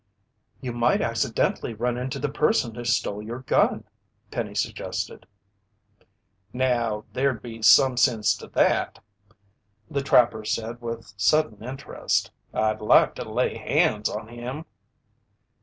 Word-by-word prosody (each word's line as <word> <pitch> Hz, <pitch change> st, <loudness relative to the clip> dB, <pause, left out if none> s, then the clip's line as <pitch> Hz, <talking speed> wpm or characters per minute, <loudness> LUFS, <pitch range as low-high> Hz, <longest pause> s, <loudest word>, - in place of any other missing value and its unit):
"You 125 Hz, -3 st, -4 dB
might 120 Hz, 0 st, +2 dB
accidently 115 Hz, -, -1 dB
run 120 Hz, +2 st, -1 dB
into 125 Hz, +1 st, -4 dB
the 145 Hz, -, -1 dB
person 145 Hz, -, +1 dB
who 120 Hz, -, -7 dB
stole 105 Hz, -3 st, 0 dB
your 115 Hz, +4 st, -6 dB
gun," 130 Hz, -, +2 dB, 0.5 s
Penny -, -, -4 dB
suggested. -, -, -4 dB, 1.2 s
"Now, 120 Hz, -4 st, 0 dB
there'd 130 Hz, -3 st, 0 dB
be 115 Hz, -1 st, -8 dB
some 125 Hz, +3 st, +6 dB
sense 110 Hz, -3 st, +3 dB
to -, -, -11 dB
that," -, -, +1 dB, 0.9 s
the 140 Hz, -, 0 dB
trapper 120 Hz, -5 st, +3 dB
said 115 Hz, +2 st, -3 dB
with 115 Hz, -2 st, -6 dB
sudden 110 Hz, 0 st, +2 dB
interest. 135 Hz, +3 st, -2 dB, 0.2 s
"I'd 110 Hz, 0 st, 0 dB
like 105 Hz, -, +5 dB
to -, -, -7 dB
lay -, -, 0 dB
hands 105 Hz, 0 st, +1 dB
on 110 Hz, +1 st, -5 dB
him!" 125 Hz, +6 st, -6 dB
120 Hz, 125 wpm, -25 LUFS, 110-130 Hz, 1.2 s, some